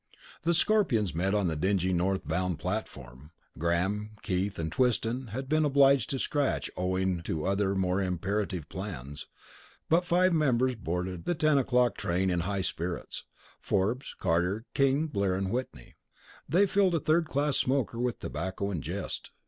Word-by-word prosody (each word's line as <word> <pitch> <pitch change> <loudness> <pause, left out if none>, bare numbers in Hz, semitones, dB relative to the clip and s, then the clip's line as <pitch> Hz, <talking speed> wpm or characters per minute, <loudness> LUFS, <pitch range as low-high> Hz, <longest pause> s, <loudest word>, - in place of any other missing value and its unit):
The 170 +1 +2
Scorpions 160 - +2
met 95 +5 0
on 100 -3 +2
the 80 - -1
dingy 95 +3 +1
north 95 -1 0
bound 90 +1 -1
platform. 70 - -5 0.3
Graham, 95 +6 0
Keith, 95 0 -1
and 80 -1 -3
Twiston 125 +2 +1
had 130 +5 -5
been 155 +2 +2
obliged 140 -3 +4
to 135 - -1
scratch 145 +1 -1
owing 95 -1 0
to 80 -2 -3
other 100 0 +1
more 95 0 +1
imperative 95 -2 -2
plans; 80 -7 -7 0.6
but 170 +3 +4
five 180 +1 +3
members 130 -5 +2
boarded 90 -3 -4
the 175 - 0
10 155 -2 +3
o'clock 125 -3 +2
train 90 +2 0
in 90 - +1
high 95 +2 -1
spirits. 85 0 -4 0.3
Forbes, 110 +8 -1
Carter, 90 +7 0
King, 140 +3 +2
Blair, 100 -10 0
and 95 0 -2
Whitney 120 - -5 0.6
they 185 +7 +5
filled 195 -2 +2
a - - +2
third 160 +3 +2
class 145 -1 0
smoker 130 -3 0
with 125 -1 -1
tobacco 95 +2 -3
and 85 -6 -3
jest. - - -5
100 Hz, 155 wpm, -29 LUFS, 90-135 Hz, 0.6 s, they